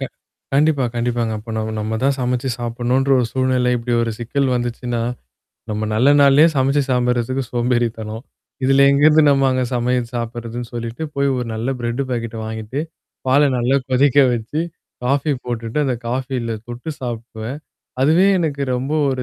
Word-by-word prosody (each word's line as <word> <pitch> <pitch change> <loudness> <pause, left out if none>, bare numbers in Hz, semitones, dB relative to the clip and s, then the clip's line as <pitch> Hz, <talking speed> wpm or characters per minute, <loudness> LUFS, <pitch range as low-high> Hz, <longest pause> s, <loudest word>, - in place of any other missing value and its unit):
க - - -1 0.5
கண்டிப்பா, 145 -1 +3
கண்டிப்பாங்க. 120 -1 -1
அப்ப 115 +2 -10
நம் 110 0 -3
நம்ம 110 +1 -2
தான் 140 0 +3
சமைச்சு 125 +1 -1
சாப்பிடணுன்ற 120 +3 0
ஒரு 125 - +1
சூழ்நிலை 130 -1 +1
இப்படி 120 +1 -3
ஒரு 115 - -1
சிக்கல் 130 +4 -1
வந்துச்சுன்னா, 120 0 -3 0.7
நம்ம 105 +1 -2
நல்ல 120 +6 +4
நாள்லயே 140 +3 +6
சமைச்சு 135 +2 +2
சாம்பிடுறதுக்கு 125 +1 +1
சோம்பேறி 120 -1 +1
தனம். 110 +1 -6 0.4
இதுல 135 +1 +5
எங்க 140 +1 +2
இருந்து 155 0 +6
நம்மாங்க 135 -2 +2
சமையல் 120 0 0
சாப்படுறதுன்னு 120 0 -4
சொல்லிட்டு 115 +4 -5
போய் 140 0 +1
ஒரு 125 -1 -2
நல்ல 115 +3 -3
பிரெட் 120 +3 -1
பாக்கெட்ட 115 -2 -3
வாங்கிட்டு. 110 +4 -4 0.5
பாலை 140 +3 +5
நல்லா 125 +3 +2
கொதிக்க 135 +2 +3
வச்சு 120 +7 -2 0.4
காஃபி 140 +3 +1
போட்டுட்டு, 115 +1 -3
அந்த 130 -2 0
காஃபில 125 -1 -2 0.2
தொட்டு 120 +6 -6
சாப்டுவேன். 120 +1 -5 0.4
அதுவே 160 +8 +4
எனக்கு 145 -4 -1
ரொம்ப 135 +4 -2 0.2
ஒரு 130 -1 -2
125 Hz, 155 wpm, -20 LUFS, 115-135 Hz, 0.7 s, நாள்லயே